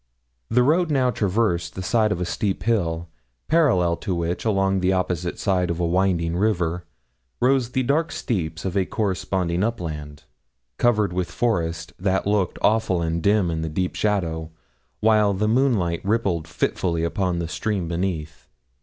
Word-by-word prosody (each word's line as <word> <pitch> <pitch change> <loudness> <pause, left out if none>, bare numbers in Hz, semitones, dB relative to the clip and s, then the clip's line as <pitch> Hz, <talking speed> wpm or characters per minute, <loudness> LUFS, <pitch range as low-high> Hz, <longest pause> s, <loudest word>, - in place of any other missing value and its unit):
The 125 +2 +4
road 165 +5 +3
now 130 -4 +2
traversed 95 -6 0
the 95 - -4
side 110 +1 +2
of 90 - -1
a 90 - -1
steep 95 +2 -2
hill, 85 -7 0 0.4
parallel 120 - +3
to 95 -4 -3
which, 85 +3 -2
along 95 -3 +2
the 90 +1 +2
opposite 90 -2 -1
side 90 -3 +1
of 85 0 -2
a 85 - +1
winding 85 -1 +1
river, 90 -4 0 0.5
rose 130 -1 +2
the 130 - +1
dark 150 +6 +1
steeps 85 -7 -3
of 95 0 -2
a 95 -2 +1
corresponding 95 -3 -1
upland, 80 -10 -4 0.6
covered 105 -6 +2
with 90 -1 -1
forest 85 -6 -1
that 95 +1 0
looked 100 -3 +1
awful 110 -4 +2
and 85 0 -1
dim 100 -2 +2
in 80 0 -2
the 80 - -2
deep 90 +4 -2
shadow, 85 -7 -1 0.5
while 105 -2 +4
the 105 +3 0
moonlight 110 -9 +2
rippled 100 -6 0
fitfully 85 +1 -1
upon 90 +1 0
the 85 -1 -2
stream 95 0 -2
beneath. 85 -2 -3
95 Hz, 160 wpm, -23 LUFS, 85-110 Hz, 0.6 s, The